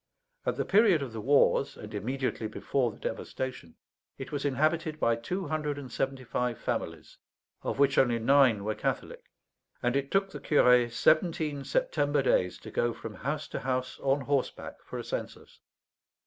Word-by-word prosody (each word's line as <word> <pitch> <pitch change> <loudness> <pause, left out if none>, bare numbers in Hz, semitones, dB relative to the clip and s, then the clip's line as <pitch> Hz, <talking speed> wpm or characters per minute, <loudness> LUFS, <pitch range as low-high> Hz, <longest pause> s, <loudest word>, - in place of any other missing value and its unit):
At - - +1
the - - -2
period 200 -8 +4
of 125 -4 -7
the 110 - -5
wars, 140 +2 +3
and 105 +1 -9
immediately 120 +2 -2
before 120 +3 -1
the 105 - -11
devastation, 130 -11 -5 0.4
it 135 - -7
was 145 -1 -3
inhabited 155 +3 0
by 115 -4 +3
two 180 +11 -4
hundred 150 -2 -2
and 135 -4 -8
seventy 135 +1 -2
five 125 -1 -2
families, - - -4 0.4
of - - -3
which 140 0 +4
only 120 -3 +3
nine 125 -3 +4
were 110 +1 -1
Catholic; - - -3 0.6
and 120 +1 +1
it 140 0 0
took 195 0 +1
the - - -7
curé 125 -5 +4
seventeen 155 +2 +2
September 145 - +1
days 90 -8 +2
to - - -9
go 120 0 0
from 115 - -7
house 150 +6 -3
to - - -4
house 130 0 -2
on 140 +1 +1
horseback 140 0 -2
for - - -7
a - - -4
census. - - -6
135 Hz, 170 wpm, -29 LUFS, 120-150 Hz, 0.6 s, period